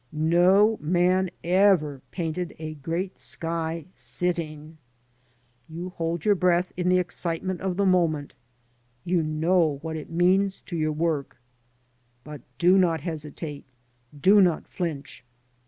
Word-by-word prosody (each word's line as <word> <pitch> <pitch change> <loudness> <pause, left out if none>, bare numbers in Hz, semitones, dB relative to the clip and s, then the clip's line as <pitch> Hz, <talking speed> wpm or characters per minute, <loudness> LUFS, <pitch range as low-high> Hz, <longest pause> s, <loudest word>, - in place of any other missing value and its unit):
No 180 +7 +4
man 180 +3 +2
ever 175 -6 +3
painted 175 0 -4
a 155 0 -6
great 165 +6 -4
sky 165 -1 -4
sitting. 155 +3 -3 0.9
You 170 +3 -6
hold 165 -2 -3
your 210 - +5
breath 180 -1 +1
in 180 0 0
the 185 - +4
excitement 180 0 -3
of 185 -1 -2
the 200 - +2
moment, 165 -6 +1 0.7
you 175 -1 +1
know 155 0 +1
what 160 -1 -4
it 155 - -7
means 185 +3 +2
to 175 - -7
your 155 -1 0
work; 155 -5 -2 0.8
but 150 -2 -9 0.2
do 180 +6 +5
not 165 -4 +2
hesitate, 150 -2 -6 0.6
do 200 +7 +6
not 175 -4 +2
flinch. 155 -8 -5
170 Hz, 125 wpm, -25 LUFS, 155-180 Hz, 0.9 s, do